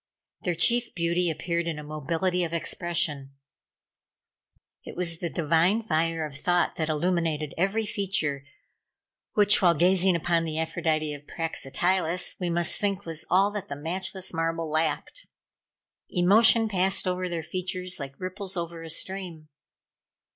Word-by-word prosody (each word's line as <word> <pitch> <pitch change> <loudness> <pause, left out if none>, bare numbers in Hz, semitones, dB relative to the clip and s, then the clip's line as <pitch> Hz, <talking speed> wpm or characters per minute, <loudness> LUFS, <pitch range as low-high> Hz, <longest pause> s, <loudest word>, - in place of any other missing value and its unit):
Their 175 -2 -1
chief 240 +7 +2
beauty 170 +1 +1
appeared 170 +2 -2
in 165 -2 -2
a 150 - -7
mobility 165 +5 -1
of 170 -1 -3
expression. 160 -5 -1 1.5
It - - -9
was 165 -2 0
the 170 - -2
divine 170 +7 +2
fire 165 -3 0
of 145 -2 -8
Thought 175 +4 +1
that 160 -1 -1
illumined 155 -2 0
every 200 +5 0
feature, 185 -9 -1 0.9
which, 205 -1 +5
while 175 -3 +5
gazing 185 +3 +3
upon 170 0 +1
the 160 -1 -3
Aphrodite 155 -1 -1
of 145 0 -11
Praxitiles, 170 +3 0
we 180 -2 -1
must 170 0 +1
think 200 -1 -1
was 165 -2 -5
all 195 +3 +4
that 205 -2 -5
the 140 - -5
matchless 185 +5 -4
marble 165 -1 -1
lacked. 160 - -2 0.8
Emotion 220 +5 +5
passed 190 -1 +1
over 180 0 -1
their 170 -2 -3
features 185 +2 -3
like 135 -1 -7
ripples 185 +1 -5
over 170 -1 -4
a 165 - -8
stream. 170 -2 -4
170 Hz, 140 wpm, -27 LUFS, 160-185 Hz, 1.5 s, which